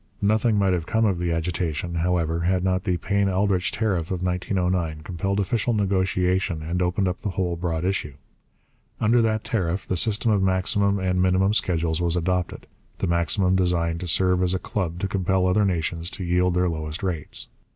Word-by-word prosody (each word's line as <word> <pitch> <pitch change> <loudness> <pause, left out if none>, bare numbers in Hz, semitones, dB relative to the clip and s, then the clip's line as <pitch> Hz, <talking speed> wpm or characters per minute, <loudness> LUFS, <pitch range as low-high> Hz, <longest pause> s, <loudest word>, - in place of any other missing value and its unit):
Nothing 110 +2 +2
might 95 -2 +2
have 85 -2 -2
come 110 0 +2
of 95 -5 +1
the 85 -1 -1
agitation, 85 0 -2
however, 85 -1 0
had 90 +2 +1
not 95 0 0
the 90 -3 +1
Payne 100 +4 0
Aldrich 95 0 +1
tariff 95 -7 -1
of 90 -1 -3
1909 90 -3 -1
compelled 95 +4 -2
official 115 +3 0
negotiation 95 -3 0
and 85 +3 -2
opened 90 +2 +1
up 90 - -2
the 105 - -3
whole 90 -2 -1
broad 85 -1 -2
issue. 90 -7 -2 0.8
Under 115 +2 +3
that 110 -1 0
tariff 95 -3 -1
the 95 - -1
system 110 +4 +2
of 100 -2 +2
maximum 95 +2 +2
and 90 -1 0
minimum 95 +2 +3
schedules 85 -4 0
was 85 -1 0
adopted, 90 0 -1 0.3
the - - -2
maximum 85 +3 +2
designed 85 -2 +1
to 90 - -5
serve 90 +2 +2
as 90 0 +2
a - - +1
club 90 -4 -3
to 100 - 0
compel 95 -1 0
other 100 +3 +3
nations 85 -2 -1
to 95 - -6
yield 90 0 +1
their 90 0 +2
lowest 80 0 -4
rates. 85 -6 -3
90 Hz, 185 wpm, -24 LUFS, 85-95 Hz, 0.8 s, Under